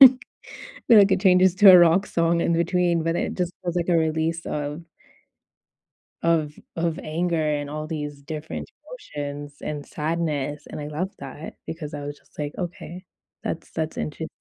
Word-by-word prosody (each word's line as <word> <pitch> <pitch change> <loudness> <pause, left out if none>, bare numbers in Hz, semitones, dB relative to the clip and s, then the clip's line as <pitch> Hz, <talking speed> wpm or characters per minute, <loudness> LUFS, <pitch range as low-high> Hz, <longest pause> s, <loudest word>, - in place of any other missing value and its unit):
and 260 -1 +10 0.7
like 205 -4 +7
it 190 - +2
changes 185 -2 +5
to 200 0 +9
a 180 - +10
rock 175 +4 +5
song 170 0 +1
in 170 - +2
between, 170 0 +2
but 165 +1 0
it - - -2
just 180 -1 -2
was 175 -1 -3
like 175 0 0
a 170 - +4
release 160 +1 0
of 150 +2 -3 1.4
of 160 -3 +2 0.2
of 165 -1 -1
anger 170 +2 -1
and 145 -1 -1
all 155 0 -4
these 150 -3 -5
different 155 +1 -6 0.5
emotions 145 0 -5
and 145 -1 -4
sadness, 150 -2 -2
and - - -6
I 145 - -5
love 165 +6 -3
that 140 +3 -8
because 155 -3 -6
I 145 - -5
was 145 0 -6
just, - - -29
like, 145 -1 -3
"Okay, 180 0 -6 0.4
that's 165 - -4
that's 160 -1 -3
inter" 160 +1 -4
165 Hz, 170 wpm, -24 LUFS, 150-175 Hz, 1.4 s, and